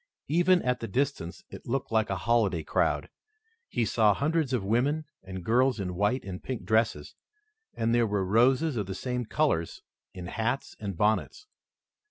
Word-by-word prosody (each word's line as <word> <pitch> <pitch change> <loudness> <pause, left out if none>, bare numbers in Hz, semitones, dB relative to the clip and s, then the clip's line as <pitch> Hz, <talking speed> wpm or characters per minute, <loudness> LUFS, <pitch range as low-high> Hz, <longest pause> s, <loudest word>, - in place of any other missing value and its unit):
Even 175 +3 +4
at 125 0 0
the 115 - -4
distance 125 - -2
it - - -10
looked 130 0 -2
like 110 -1 +2
a 95 - 0
holiday 100 -4 +1
crowd. - - 0 0.6
He 120 -2 0
saw 105 -1 +3
hundreds 155 - 0
of 125 -6 0
women 135 +9 +1 0.2
and 95 -1 -8
girls 125 +1 +3
in 90 -2 -3
white 105 +8 0
and 95 -1 -6
pink 130 -3 -5
dresses, 110 -9 +1 0.6
and 115 +1 0
there 120 -1 +3
were 100 -2 0
roses 125 - +3
of 105 -3 -2
the 95 - -4
same 125 +2 -3
colors 110 - 0 0.3
in 90 -1 -7
hats 115 +8 -2
and 100 -4 -5
bonnets. 110 - 0
115 Hz, 170 wpm, -28 LUFS, 100-130 Hz, 0.6 s, Even